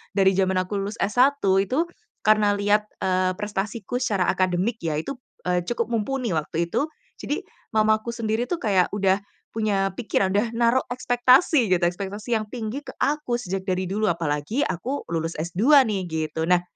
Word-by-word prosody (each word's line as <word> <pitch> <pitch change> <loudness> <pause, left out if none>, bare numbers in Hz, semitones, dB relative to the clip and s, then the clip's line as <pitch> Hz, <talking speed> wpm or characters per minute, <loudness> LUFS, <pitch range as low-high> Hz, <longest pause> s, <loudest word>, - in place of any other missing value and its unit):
dari 195 -1 +5
jaman 190 0 +1
aku 200 +2 -3
lulus 200 +2 -4
S1 260 +6 +3 0.2
itu, 255 - +1 0.4
karena 215 -1 +4
lihat, 205 +1 +2 0.2
eee, 185 0 +1
prestasiku 210 +4 -3
secara 200 -7 +1
akademik 185 +5 0
ya 160 -3 -2
itu, 155 - -3 0.3
eee, 180 -1 0
cukup 240 -1 -2
mumpuni 235 0 -1
waktu 160 +1 -1
itu. 295 - +1 0.3
Jadi - - -3 0.3
mamaku 215 +1 +2
sendiri 230 0 -1
tuh 345 +5 -3
kayak 195 -5 +2
udah 195 -1 +2 0.3
punya 205 -3 0
pikiran, 215 -5 0
udah 210 +4 0
naro 235 +2 +2
ekspektasi 250 +3 +4
gitu, 175 - +2
ekspektasi 200 +6 -1
yang 215 - -4
tinggi 230 +5 -5
ke - - -8
aku 285 -5 0
sejak 190 -2 -4
dari 185 -1 -1
dulu, 215 +3 0
apalagi 165 - -1
aku 250 - -3
lulus 165 0 -2
S2 210 - +5
nih 195 -3 -1
gitu. 160 -1 -2
Nah 180 +1 +3
205 Hz, 165 wpm, -24 LUFS, 185-235 Hz, 0.4 s, dari